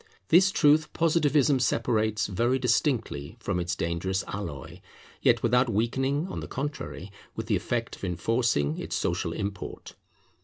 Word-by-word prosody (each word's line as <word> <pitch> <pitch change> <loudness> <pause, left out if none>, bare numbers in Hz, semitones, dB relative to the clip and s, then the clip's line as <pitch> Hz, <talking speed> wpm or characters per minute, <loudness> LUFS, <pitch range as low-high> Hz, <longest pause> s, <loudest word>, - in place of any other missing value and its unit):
This 185 +3 +6
truth 155 -3 +3
Positivism 150 -4 +3
separates 110 -3 +1
very 120 +6 +1
distinctly 120 - 0
from 90 - -2
its 85 -1 -2
dangerous 90 +3 -1
alloy, 85 -10 -6 0.4
yet - - +3
without 125 +2 +3
weakening, 135 - 0
on - - -5
the - - -6
contrary, 135 - -5 0.2
with 115 - -4
the 110 -1 +1
effect 115 +4 -2
of - - -19
enforcing, 90 - 0
its - - -4
social 85 0 -1
import. 100 +2 -5
115 Hz, 140 wpm, -27 LUFS, 95-135 Hz, 0.4 s, This